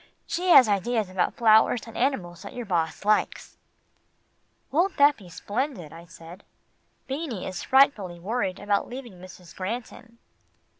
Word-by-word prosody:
She 360 Hz, +2 st, -2 dB
has 260 Hz, -8 st, +8 dB
ideas 210 Hz, +1 st, 0 dB
about 185 Hz, -1 st, -1 dB
flowers 220 Hz, +1 st, +4 dB
and 230 Hz, -, -12 dB
animals 185 Hz, -10 st, -2 dB
that 200 Hz, -, -10 dB
your 245 Hz, -1 st, -5 dB
boss 170 Hz, -2 st, -2 dB
likes." 210 Hz, 0 st, 0 dB, 1.1 s
"Won't 345 Hz, +7 st, +1 dB
that 285 Hz, +1 st, +5 dB
be 190 Hz, -4 st, -15 dB
splendid," 205 Hz, -, -4 dB
I 165 Hz, +1 st, -12 dB
said. 170 Hz, +2 st, -13 dB, 0.6 s
"Beanie 270 Hz, -, -4 dB
is 185 Hz, -1 st, -5 dB
frightfully 225 Hz, -10 st, +2 dB
worried 195 Hz, 0 st, -2 dB
about 205 Hz, 0 st, -1 dB
leaving 240 Hz, -7 st, -9 dB
Mrs. 180 Hz, -2 st, -14 dB
Granton." 230 Hz, +3 st, -7 dB
210 Hz, 140 wpm, -25 LUFS, 185-250 Hz, 1.1 s, has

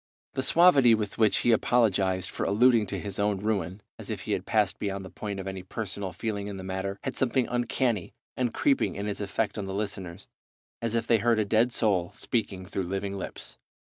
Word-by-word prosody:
The -, -, -1 dB
suavity 135 Hz, -5 st, +6 dB
with 105 Hz, -1 st, -4 dB
which 110 Hz, -2 st, +4 dB
he 120 Hz, -, +5 dB
apologized 100 Hz, -6 st, +2 dB
for -, -, -3 dB
alluding 115 Hz, +1 st, +4 dB
to -, -, -3 dB
his 100 Hz, -2 st, -5 dB
own 100 Hz, -1 st, +1 dB
ruin, 100 Hz, -2 st, -2 dB, 0.2 s
as -, -, -6 dB
if -, -, -3 dB
he -, -, -5 dB
had -, -, -1 dB
passed 105 Hz, -2 st, +1 dB
beyond 100 Hz, -1 st, -3 dB
the 95 Hz, -, -10 dB
point 100 Hz, -2 st, -5 dB
of 95 Hz, -, -5 dB
any 95 Hz, -1 st, -5 dB
personal 95 Hz, 0 st, -5 dB
feeling 100 Hz, +2 st, -3 dB
in 100 Hz, -1 st, -5 dB
the 95 Hz, -, -7 dB
matter, 95 Hz, +1 st, -3 dB
had 130 Hz, -, -3 dB
something 130 Hz, 0 st, +1 dB
uncanny 120 Hz, -4 st, -1 dB, 0.2 s
and 125 Hz, -2 st, 0 dB
creeping 275 Hz, -, +1 dB
in 100 Hz, -, -4 dB
its 105 Hz, 0 st, -3 dB
effect 105 Hz, +1 st, -2 dB
on 100 Hz, -, -4 dB
the 95 Hz, -, -4 dB
listeners, 100 Hz, -3 st, -4 dB, 0.5 s
as 115 Hz, 0 st, -1 dB
if 115 Hz, -, 0 dB
they 115 Hz, -, +3 dB
heard 115 Hz, +1 st, +3 dB
a 110 Hz, -, +2 dB
dead 115 Hz, +4 st, +3 dB
soul 95 Hz, -7 st, +2 dB
speaking 100 Hz, -5 st, -2 dB
through 95 Hz, +1 st, -3 dB
living 100 Hz, +2 st, -3 dB
lips. 95 Hz, -, -7 dB
105 Hz, 210 wpm, -28 LUFS, 95-115 Hz, 0.5 s, suavity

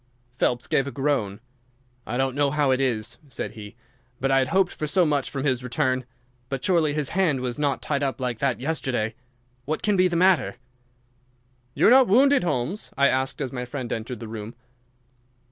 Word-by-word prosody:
Phelps 120 Hz, -1 st, 0 dB
gave 135 Hz, -, +1 dB
a -, -, -4 dB
groan. 120 Hz, -7 st, -1 dB, 0.7 s
"I 120 Hz, -, -2 dB
don't 135 Hz, 0 st, 0 dB
know 145 Hz, +1 st, +2 dB
how 145 Hz, -1 st, +1 dB
it 130 Hz, +1 st, +2 dB
is," 115 Hz, -5 st, -1 dB
said 130 Hz, -, -4 dB
he, 105 Hz, 0 st, -10 dB, 0.4 s
"but 135 Hz, +1 st, 0 dB
I 135 Hz, -, +5 dB
had 130 Hz, -, +1 dB
hoped 190 Hz, +2 st, +2 dB
for 155 Hz, -, -4 dB
so 180 Hz, +3 st, +3 dB
much 145 Hz, -3 st, 0 dB
from 135 Hz, -2 st, -4 dB
his 130 Hz, -3 st, 0 dB
return. 130 Hz, -1 st, 0 dB, 0.4 s
But 135 Hz, -2 st, -3 dB
surely 165 Hz, -5 st, +2 dB
his 150 Hz, -3 st, -1 dB
hand 170 Hz, -7 st, +1 dB
was 125 Hz, +1 st, -3 dB
not 140 Hz, -3 st, 0 dB
tied 140 Hz, -2 st, -1 dB
up 140 Hz, -1 st, -1 dB
like 125 Hz, -3 st, -2 dB
that 135 Hz, -3 st, 0 dB
yesterday. 130 Hz, -6 st, -2 dB, 0.5 s
What 155 Hz, +2 st, -3 dB
can 210 Hz, -1 st, +2 dB
be 185 Hz, -1 st, +4 dB
the 175 Hz, -, -2 dB
matter?" 185 Hz, 0 st, +3 dB, 1.2 s
"You -, -, +2 dB
are -, -, +7 dB
not 260 Hz, -1 st, +7 dB
wounded, 270 Hz, +5 st, +5 dB
Holmes?" 155 Hz, -, -2 dB
I 140 Hz, 0 st, +5 dB
asked, 130 Hz, +2 st, -1 dB
as 130 Hz, -3 st, -3 dB
my 125 Hz, -2 st, -4 dB
friend 125 Hz, -1 st, -4 dB
entered 115 Hz, +1 st, -5 dB
the 115 Hz, -, -7 dB
room. 110 Hz, +1 st, -7 dB
135 Hz, 195 wpm, -24 LUFS, 125-155 Hz, 1.2 s, are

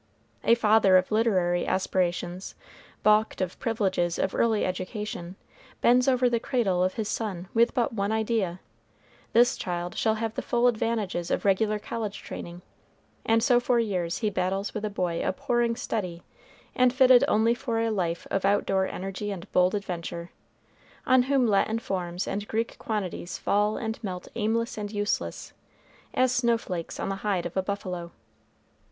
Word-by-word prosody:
A 230 Hz, -, +5 dB
father 215 Hz, -4 st, +5 dB
of 185 Hz, +2 st, 0 dB
literary 185 Hz, -6 st, +2 dB
aspirations, 180 Hz, -1 st, -1 dB, 0.5 s
balked 215 Hz, +1 st, +3 dB
of 185 Hz, -1 st, -3 dB
privileges 190 Hz, -7 st, 0 dB
of 190 Hz, -, -1 dB
early 225 Hz, -2 st, +2 dB
education, 185 Hz, -1 st, -4 dB, 0.4 s
bends 250 Hz, +2 st, +4 dB
over 255 Hz, -1 st, +4 dB
the 235 Hz, -1 st, +1 dB
cradle 200 Hz, -8 st, +1 dB
of 185 Hz, -, 0 dB
his 220 Hz, -3 st, -2 dB
son 190 Hz, -6 st, -3 dB
with 235 Hz, +3 st, +3 dB
but 240 Hz, -2 st, +1 dB
one 200 Hz, -1 st, -1 dB
idea. 220 Hz, -5 st, -1 dB, 0.7 s
This 240 Hz, +2 st, +5 dB
child 175 Hz, 0 st, -4 dB
shall 220 Hz, -1 st, +1 dB
have 220 Hz, 0 st, -3 dB
the -, -, -3 dB
full 240 Hz, 0 st, +1 dB
advantages 220 Hz, -7 st, 0 dB
of -, -, -1 dB
regular 210 Hz, +2 st, +2 dB
college 210 Hz, -1 st, -5 dB
training; 175 Hz, +1 st, -8 dB, 0.6 s
and 225 Hz, 0 st, +3 dB
so 245 Hz, -1 st, +5 dB
for 245 Hz, 0 st, +1 dB
years 185 Hz, -7 st, 0 dB
he 210 Hz, -, +1 dB
battles 195 Hz, +2 st, -1 dB
with 215 Hz, -, -4 dB
a -, -, -1 dB
boy 180 Hz, -4 st, -2 dB
abhorring 235 Hz, +4 st, 0 dB
study, 180 Hz, -7 st, -4 dB, 0.5 s
and 255 Hz, 0 st, +4 dB
fitted 255 Hz, 0 st, +6 dB
only 225 Hz, -2 st, +3 dB
for 240 Hz, -2 st, -2 dB
a 225 Hz, 0 st, +1 dB
life 175 Hz, -5 st, -2 dB
of 195 Hz, -, 0 dB
out 200 Hz, +1 st, +2 dB
door 190 Hz, -1 st, +1 dB
energy 195 Hz, +2 st, -5 dB
and 195 Hz, -1 st, -7 dB
bold 180 Hz, +2 st, +3 dB
adventure, 175 Hz, -3 st, -5 dB, 0.7 s
on 255 Hz, 0 st, +5 dB
whom 270 Hz, -3 st, +3 dB
Latin 220 Hz, +1 st, +2 dB
forms 180 Hz, -5 st, -3 dB
and 205 Hz, +1 st, -3 dB
Greek 225 Hz, +1 st, -2 dB
quantities 190 Hz, -5 st, -3 dB
fall 210 Hz, +1 st, +1 dB
and 220 Hz, 0 st, -4 dB
melt 180 Hz, -3 st, -5 dB
aimless 230 Hz, +1 st, -1 dB
and 205 Hz, -1 st, -4 dB
useless, 205 Hz, -1 st, -2 dB, 0.6 s
as 255 Hz, -1 st, +3 dB
snow 235 Hz, -2 st, +3 dB
flakes 180 Hz, -7 st, -6 dB
on -, -, -2 dB
the 195 Hz, -, -2 dB
hide 195 Hz, -3 st, -1 dB
of 175 Hz, -, -5 dB
a 190 Hz, -, +2 dB
buffalo. 185 Hz, -3 st, -4 dB
205 Hz, 165 wpm, -27 LUFS, 185-230 Hz, 0.7 s, fitted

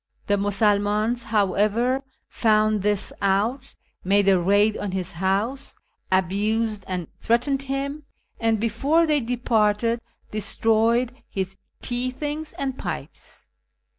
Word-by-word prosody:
The 205 Hz, -, +2 dB
Musulmans, 205 Hz, +3 st, +1 dB
however, 215 Hz, +5 st, +1 dB, 0.3 s
found 215 Hz, -2 st, +2 dB
this 205 Hz, 0 st, 0 dB
out, 215 Hz, +7 st, 0 dB, 0.3 s
made 200 Hz, +1 st, +3 dB
a 190 Hz, -2 st, +5 dB
raid 205 Hz, +4 st, +3 dB
on 200 Hz, -2 st, -4 dB
his 185 Hz, -1 st, -2 dB
house, 200 Hz, +10 st, -1 dB, 0.4 s
abused 205 Hz, +3 st, +1 dB
and 180 Hz, -3 st, -3 dB
threatened 255 Hz, +4 st, +1 dB
him, 275 Hz, +2 st, -4 dB, 0.3 s
and, 225 Hz, -1 st, +1 dB
before 270 Hz, +10 st, +2 dB
tliey 300 Hz, -4 st, +1 dB
departed, 230 Hz, -1 st, +1 dB, 0.3 s
destroyed 225 Hz, +3 st, +2 dB, 0.2 s
his 190 Hz, 0 st, -3 dB, 0.3 s
tea 245 Hz, +1 st, -1 dB
things 295 Hz, +4 st, -5 dB
and 270 Hz, -1 st, -4 dB
pipes. -, -, -7 dB
220 Hz, 110 wpm, -24 LUFS, 200-250 Hz, 0.4 s, a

